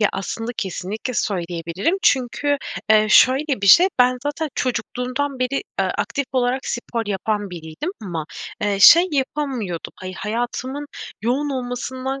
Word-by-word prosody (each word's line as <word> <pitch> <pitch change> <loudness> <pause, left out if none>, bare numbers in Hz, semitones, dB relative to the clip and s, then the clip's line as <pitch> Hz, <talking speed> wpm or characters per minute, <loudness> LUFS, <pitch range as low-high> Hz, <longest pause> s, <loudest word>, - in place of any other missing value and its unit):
Ya 210 - +4
aslında 225 +4 -4
kesinlikle 200 +6 -4
söyleyebilirim. 175 - -1
Çünkü, 280 +3 +2 0.3
eee, 215 0 +6
şöyle 265 -2 +4
bir - - +1
şey. 355 - +8
Ben 250 0 +4
zaten 295 +2 -2
çocukluğumdan 255 +3 -2
beri, 255 +2 -1
eee, 405 - -3
aktif 280 -2 -1
olarak 255 +1 0
spor 235 -2 -3
yapan 205 0 -2
biriydim. 165 - -6
Ama, 170 -6 -4 0.4
eee, 205 -1 0
şey 340 - +9
yapamıyordum. 260 - -2 0.2
Hayatımın 245 +6 -3 0.4
yoğun 270 +5 0
olmasından 260 +1 -4
245 Hz, 130 wpm, -21 LUFS, 205-275 Hz, 0.4 s, şey